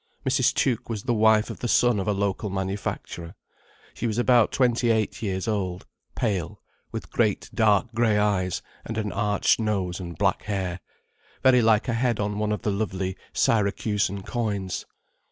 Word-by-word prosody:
Mrs. 130 -1 +3
Tuke 125 -4 0
was 110 -3 -3
the 120 - 0
wife 110 -1 +4
of - - -9
the 120 - -2
son 120 -2 +3
of 95 - -3
a - - +3
local 100 +1 -1
manufacturer. 95 -3 -4 0.6
She 120 - -3
was 110 -1 -2
about 120 -2 +4
twenty 120 -2 +2
eight 110 -2 0
years 95 0 -2
old, 95 -5 -2 0.3
pale, 100 -9 -2 0.3
with - - -6
great - - 0
dark 110 +2 +2
grey 110 -2 +2
eyes 100 -4 0 0.2
and 110 - -5
an 105 -2 -1
arched 105 -1 +2
nose 100 -5 -1
and 85 -2 -7
black 100 -1 +1
hair, 95 -4 -2 0.6
very 130 -2 +6
like 110 -2 +3
a 120 - 0
head 120 -1 +1
on 105 0 -1
one 105 0 0
of 105 - -2
the 105 - +1
lovely 95 -2 -2 0.2
Syracusan 100 -2 +1
coins. 100 -6 -3
105 Hz, 170 wpm, -25 LUFS, 95-115 Hz, 0.6 s, very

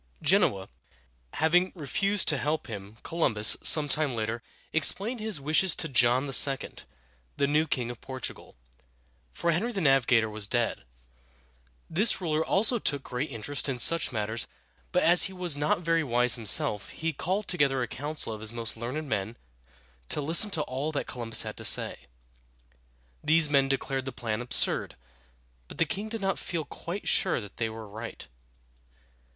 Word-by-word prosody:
Genoa 150 - +2 0.7
having 175 +4 +2
refused 195 +5 0
to 150 - +3
help 150 +4 -2
him, 105 -2 -9
Columbus, 115 -11 +2
some 150 -2 +5
time 145 -2 -1
later, 110 +1 -3 0.3
explained 205 +9 +3
his 215 -6 -2
wishes 155 +6 +3
to 165 - -1
John 125 -1 +3
II., 135 0 +3 0.7
the 140 - +2
new 150 +3 +1
king 120 -4 -2
of 120 - -12
Portugal, 130 -2 -7 0.8
for 170 - -1
Henry 205 +9 -1
the 205 - -4
Navigator 135 -7 +3
was 105 -1 -3
dead. 120 - -2 1.0
This 195 +8 +3
ruler 160 -3 -1
also 220 +8 +2
took 145 -8 -1
great 125 +5 -4
interest 135 +4 -1
in 130 - -2
such 165 +6 +5
matters, 110 0 -2 0.4
but - - +1
as 175 +2 +7
he 190 - -6
was 180 -4 +1
not 150 +4 0
very 165 -1 +1
wise 125 -2 +2
himself, 105 -2 0
he 165 0 -4
called 190 +6 -3
together 140 -7 +1
a - - -3
council 145 -3 -4
of 110 - -9
his 110 0 -1
most 115 -1 -3
learned 125 +7 -5
men 110 -1 -3 0.7
to - - -1
listen 165 +8 +2
to 165 -6 -1
all 140 +4 -4
that 145 - -2
Columbus 115 -2 +1
had - - -7
to - - -7
say. - - +1 1.2
These 160 -1 +3
men 135 -1 +3
declared 135 -1 -2
the 135 - -4
plan 115 -2 -4
absurd; 125 - +2 0.7
but - - -11
the 165 - +2
king 205 +7 -4
did 225 -1 -5
not 195 0 -1
feel 165 -3 -4
quite 175 +7 -7
sure 185 - +2
that 105 -4 -11
they 115 -1 -1
were 110 -1 -9
right. 110 +3 -9
140 Hz, 165 wpm, -27 LUFS, 120-165 Hz, 1.2 s, as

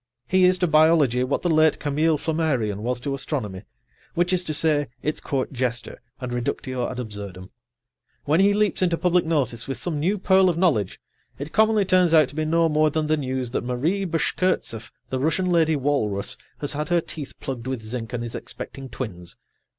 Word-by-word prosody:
He 185 -1 +4
is 180 0 +4
to 180 - +1
biology 155 -6 +4
what 130 +2 -1
the 175 - +1
late 155 0 +4
Camille 150 +2 +1
Flammarion 140 -11 -1
was 125 +2 -1
to 140 +2 -2
astronomy, 130 - -4 0.5
which 175 +2 +2
is 180 -1 +1
to 155 - -2
say, 150 -2 +2 0.2
its 150 - -1
court 135 0 -2
jester 120 -2 -3 0.2
and 125 -2 -5
reductio 125 +1 -2
ad 125 - -6
absurdum. 100 -5 -7 0.7
When 155 +4 +2
he 200 +1 +4
leaps 210 -2 +1
into 175 -2 +2
public 180 -1 +2
notice 125 -7 0
with 135 - -3
some 160 -4 -2
new 185 +8 +1
pearl 190 -1 +4
of 170 - -1
knowledge, 150 - +1 0.4
it 145 +3 -7
commonly 220 -1 +3
turns 180 -3 +4
out 155 -4 +5
to - - -12
be 155 0 -1
no 165 +1 +3
more 155 0 +3
than 155 +1 -1
the 155 +1 +2
news 130 -4 -3
that - - -2
Marie 145 +11 -1
Bashkirtseff, 165 -8 -1 0.2
the 130 - -1
Russian 160 +6 +1
lady 160 -2 +3
walrus, 130 -8 0 0.3
has 145 - -2
had 150 +3 -3
her 175 0 +3
teeth 155 -3 -7
plugged 130 -2 -5
with 130 -4 -3
zinc 115 +1 -5
and 120 -1 -3
is 120 - -6
expecting 135 -1 -7
twins. 90 -8 -6
150 Hz, 195 wpm, -24 LUFS, 125-165 Hz, 0.7 s, out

